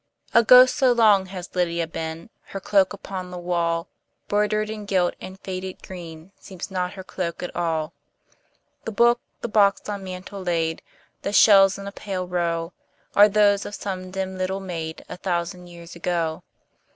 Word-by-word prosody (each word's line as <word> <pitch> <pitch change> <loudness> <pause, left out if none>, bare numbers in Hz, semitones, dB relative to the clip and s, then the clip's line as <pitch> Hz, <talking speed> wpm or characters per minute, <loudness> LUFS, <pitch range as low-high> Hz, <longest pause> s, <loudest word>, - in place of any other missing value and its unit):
A 235 - +6
ghost 255 +2 +8
so 265 -3 +4
long 210 -5 +4
has 185 -1 -8
Lydia 170 -2 0
been, 160 +4 -6
Her 195 - -6
cloak 195 -1 +3
upon 190 -2 -6
the 180 - -7
wall, 170 -1 -1 0.4
Broidered, 210 +1 +1
and 210 -2 -7
gilt, 185 -3 +2
and 190 +1 -9
faded 185 0 -6
green, 170 -1 -10
Seems 190 0 -8
not 180 0 -2
her 190 - -8
cloak 180 -2 -4
at 180 - -6
all. 160 -3 -1 0.9
The 225 - -3
book, 235 +3 +3 0.2
the - - -2
box 205 -2 +3
on 205 -2 -4
mantel 185 +1 -7
laid, 165 -3 -1 0.4
The 200 - -3
shells 195 -2 +6
in 200 - -8
a 200 - -5
pale 190 -3 -5
row, 170 -1 -1 0.4
Are 205 +1 +8
those 205 -1 +3
of 205 - -6
some 185 -2 -5
dim 190 0 -4
little 190 +1 -1
maid, 165 -4 -6
A - - -8
thousand 180 -1 -3
years 170 0 -12
ago. 170 -2 -2
185 Hz, 170 wpm, -24 LUFS, 175-200 Hz, 0.9 s, ghost